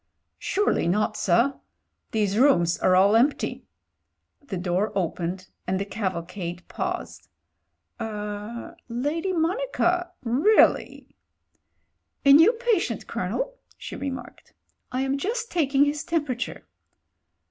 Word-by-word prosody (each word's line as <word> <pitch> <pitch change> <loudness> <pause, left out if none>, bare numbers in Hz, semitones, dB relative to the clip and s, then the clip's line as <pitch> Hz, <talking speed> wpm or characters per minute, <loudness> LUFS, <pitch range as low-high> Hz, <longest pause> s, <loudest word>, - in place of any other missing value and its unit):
€ti - - -52
'Surely 410 - +1
not, 215 +4 +1
sir. 235 +9 +2 0.5
These 205 -3 0
rooms 175 -11 +4
are 185 - +4
all 195 +3 +5
empty." 260 +6 +1 0.7
The 225 -10 -5
door 180 +4 0
opened 180 0 -2 0.2
and 185 +1 0
the 200 - -2
cavalcade 180 -3 -4
paused. - - -5 0.7
"Er 210 +1 -5
— - - -45
^Lady 295 +10 -1
Monica... 355 -1 0
really." 280 - +3 1.1
"A 275 - +8
new 325 +9 +8
patient, 470 -5 0
Colonel," - - -3 0.2
she - - -7
remarked. 265 -3 -7 0.4
"I 255 +1 -1
am 270 +1 0
just 455 - -2
taking 285 -4 +3
his 290 0 -1
temperature." 270 -7 -2
250 Hz, 115 wpm, -25 LUFS, 200-325 Hz, 1.1 s, A